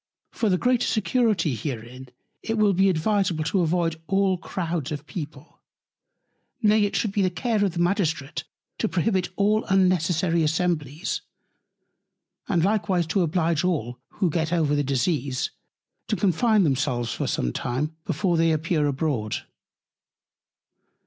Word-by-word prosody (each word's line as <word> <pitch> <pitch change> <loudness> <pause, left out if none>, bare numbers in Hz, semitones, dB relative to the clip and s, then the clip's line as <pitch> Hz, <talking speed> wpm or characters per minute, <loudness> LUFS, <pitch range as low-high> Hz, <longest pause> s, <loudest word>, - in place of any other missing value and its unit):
For 220 - 0
the 185 - +3
greater 250 +3 +2
Security 215 - +1
herein, 125 +1 -6 0.3
it 225 0 -2
will 210 -2 +4
be 195 +2 +4
advisable 185 -1 +1
to 180 +4 +1
avoid 165 -1 0
all 195 -1 +2
Crouds 170 -4 -3
of 145 0 -5
People. 150 -2 -8 1.0
Nay 215 -2 +4
it 200 - -3
should 215 - 0
be 200 - 0
the 185 - +3
Care 205 +5 0
of 195 -4 0
the 170 - -4
Magistrate 170 -5 0 0.4
to 220 - 0
prohibit 185 0 0
all 210 +3 +2
unnecessary 180 -3 +2
Assemblies; 160 0 -1 1.3
and 170 -4 +2
likewise 190 -3 +1
to 175 +5 0
oblige 170 -1 +1
all, 130 -9 -1
who 185 -5 0
get 160 0 -1
over 160 -4 +2
the 145 0 +2
Disease, 135 0 -1 0.6
to - - 0
Confine 210 +2 +3
themselves 125 -5 0
for - - -3
some - - -1
time, 145 +6 -2
before 175 +1 0
they 165 0 +3
appear 155 -1 +1
abroad. 135 -7 -1
170 Hz, 140 wpm, -25 LUFS, 150-195 Hz, 1.3 s, will